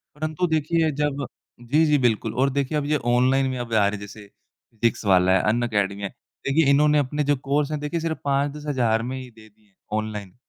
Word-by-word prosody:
परंतु 155 +3 -2
देखिए 160 0 +1
जब 145 -1 -2 0.4
जी, 145 +7 +2
जी। 150 -1 +3
बिल्कुल 120 -5 0
और 135 +2 +2
देखिए 140 +2 -1
अब 145 - -1
ये 150 +1 +1 0.2
ऑनलाइन 130 +2 +3
में 130 - -3
अब 120 -1 -5
आ 105 -2 +4
रहे - - 0
हैं, 105 - -5
जैसे 105 +1 -11 0.4
फिज़िक्सवाला 100 -5 +2
है, - - +1
अनएकेडमी 105 -4 0
है, 100 - -2 0.4
देखिए 140 +1 +3
इन्होंने 150 +1 +4
अपने 145 +2 -1
जो 145 0 +2
कोर्स 145 +1 +1
है 155 - -1
देखिए 150 +3 -3
सिर्फ़ 160 -1 -3
5-10 140 +1 -1
हज़ार 120 -6 +1
में 130 +2 -4
ही 130 -1 -8
दे 110 -1 -17
दिए 105 +1 -32
हैं 100 - -35 0.2
ऑनलाइन, 105 -3 -5
135 Hz, 210 wpm, -23 LUFS, 110-150 Hz, 0.4 s, आ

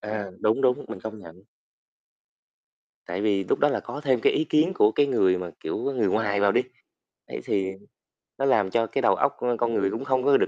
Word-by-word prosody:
À, 105 -1 -4
đúng, 110 +5 +2
đúng, 125 -1 +2
mình 95 - -7
công 110 +1 -7
nhận. 90 0 -14 1.6
Tại 90 +3 -4
vì 100 -2 +1
lúc - - 0
đó 145 - +4
là 135 - -1
có 145 - -7
thêm 130 -4 +2
ý 155 - +2
kiến 155 +4 +2
của 110 - +4 0.2
người 95 -8 +2
mà, 90 -1 -6
kiểu, - - -4
người 125 -7 0
ngoài 100 0 0
vào 100 0 +4
đi, 125 - +3 0.7
ấy - - -6
thì 95 -1 -1 0.7
nó 135 - -1
làm 105 -7 +3
cho 115 +3 +1
cái - - -2
đầu - - +4
óc - - +1
của 120 -1 -1
con 115 -1 0
người 95 - +1
cũng 125 +5 -5
không 130 -1 +1
có 140 -1 +5
được - - +1
110 Hz, 220 wpm, -25 LUFS, 100-130 Hz, 1.6 s, có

